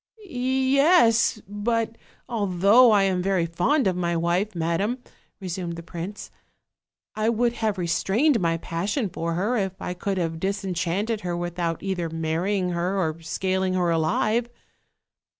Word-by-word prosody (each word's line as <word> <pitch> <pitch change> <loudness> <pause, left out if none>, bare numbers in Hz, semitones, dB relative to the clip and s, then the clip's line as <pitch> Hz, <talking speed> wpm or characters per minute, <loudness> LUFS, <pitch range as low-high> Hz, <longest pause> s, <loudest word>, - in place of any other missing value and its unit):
"Yes! 260 - +3
but 225 +3 -1 0.3
although 205 +2 +4
I 205 -2 +4
am 185 -2 +1
very 190 -2 +1
fond 225 - +1
of 185 -2 +1
my 170 -1 -1
wife, 175 +5 0
madam," 170 +8 0 0.4
resumed 180 -2 -4
the 170 - -8
prince, 175 +4 -7 0.8
"I 215 +1 0
would 235 +1 +1
have 220 -4 -1
restrained 210 - +2
my 165 -1 +1
passion 195 - -2
for 165 0 -3
her, 210 +8 0
if 190 -2 -2
I 180 - -4
could 195 +2 -3
have 165 -2 -2
disenchanted 195 +2 -2
her 175 -2 -3
without 175 -1 -3
either 185 -4 -2
marrying 165 +4 -1
her 175 +3 -1
or 160 -2 -2
scaling 185 +2 -1
her 175 -2 +1
alive." 215 +9 +1
190 Hz, 140 wpm, -24 LUFS, 170-220 Hz, 0.8 s, although